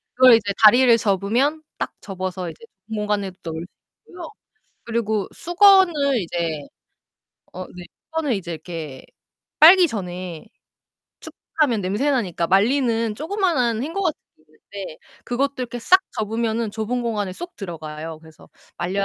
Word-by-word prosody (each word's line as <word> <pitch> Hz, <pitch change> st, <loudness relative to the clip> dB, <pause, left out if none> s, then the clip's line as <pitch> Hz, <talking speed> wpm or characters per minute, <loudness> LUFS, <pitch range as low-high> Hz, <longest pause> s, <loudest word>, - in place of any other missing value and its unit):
그걸 255 Hz, -1 st, +8 dB
이제 205 Hz, -3 st, -1 dB
다리를 240 Hz, +2 st, +7 dB
접으면 230 Hz, -, 0 dB
딱 -, -, -3 dB
접어서 185 Hz, -2 st, -5 dB
이제 165 Hz, -, -13 dB, 0.2 s
빈 220 Hz, -, -5 dB
공간에 210 Hz, -2 st, -1 dB
넣을 160 Hz, -1 st, -5 dB
수 175 Hz, -, -8 dB, 0.4 s
있고요. 350 Hz, -2 st, -8 dB, 0.6 s
그리고 220 Hz, -3 st, -1 dB
수건을 345 Hz, -, +4 dB
이제 165 Hz, -3 st, -3 dB, 0.9 s
어 185 Hz, 0 st, -6 dB
네 180 Hz, -, -9 dB, 0.2 s
수건을 320 Hz, -5 st, -1 dB
이제 180 Hz, -5 st, -4 dB
이렇게 160 Hz, -4 st, -8 dB, 0.5 s
빨기 350 Hz, +3 st, +8 dB
전에 180 Hz, -, -6 dB, 0.7 s
축축하면 260 Hz, -9 st, -2 dB
냄새나니까 205 Hz, -, 0 dB
말리는 230 Hz, +3 st, +2 dB
조그마한 305 Hz, -, 0 dB
행거 330 Hz, +8 st, -3 dB
같은 360 Hz, -6 st, -1 dB, 0.2 s
게 -, -, -29 dB, 0.4 s
있는데 190 Hz, -5 st, -7 dB, 0.3 s
그것도 275 Hz, +3 st, -1 dB
이렇게 245 Hz, -1 st, -4 dB
싹 370 Hz, +11 st, +5 dB, 0.2 s
접으면은 225 Hz, +1 st, -1 dB
좁은 225 Hz, +3 st, -3 dB
공간에 210 Hz, -5 st, -2 dB
쏙 350 Hz, -, -8 dB
들어가요. 160 Hz, -4 st, -7 dB
그래서 160 Hz, -1 st, -17 dB, 0.3 s
말려야 195 Hz, +3 st, -1 dB
220 Hz, 310 characters per minute, -22 LUFS, 185-270 Hz, 0.9 s, 그걸